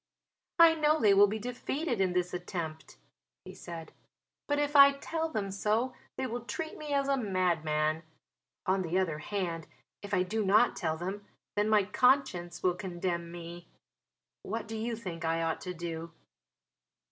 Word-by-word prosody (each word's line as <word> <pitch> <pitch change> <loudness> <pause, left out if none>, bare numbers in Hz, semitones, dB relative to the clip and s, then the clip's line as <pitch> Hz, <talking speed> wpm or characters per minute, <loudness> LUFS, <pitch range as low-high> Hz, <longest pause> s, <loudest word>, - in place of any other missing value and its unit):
"I 335 -1 +8
know 310 -1 +2
they 210 -3 +5
will 200 +1 +7
be 210 +2 -2
defeated 250 +2 -2
in 185 -2 +2
this 180 0 0
attempt," 170 -3 -5 0.5
he 185 - -9
said. 170 -3 -8 0.6
"But 290 - +1
if 290 0 0
I 280 0 +9
tell 320 +3 -3
them 205 -9 -3
so 215 +6 0 0.2
they 265 - -1
will 240 0 -3
treat 315 +6 -5
me 300 -1 -7
as 280 -1 +1
a 275 - +3
madman. 165 - 0 0.6
On 190 +1 +2
the 175 0 -1
other 165 -5 0
hand, 170 -2 -3 0.3
if 205 - -8
I 185 -3 +3
do 215 +4 -1
not 210 +5 +4
tell 160 -2 -1
them, 195 +4 -5 0.3
then 210 +1 +2
my 210 -2 +5
conscience 205 -6 +2
will 180 - +3
condemn 175 -2 -3
me. 170 0 -9 0.7
What 220 +2 -4
do 225 - -5
you 230 +1 -2
think 180 -7 -6
I 165 0 0
ought 165 -1 -1
to 180 - -5
do?" 165 -1 -5
195 Hz, 170 wpm, -31 LUFS, 175-240 Hz, 0.7 s, I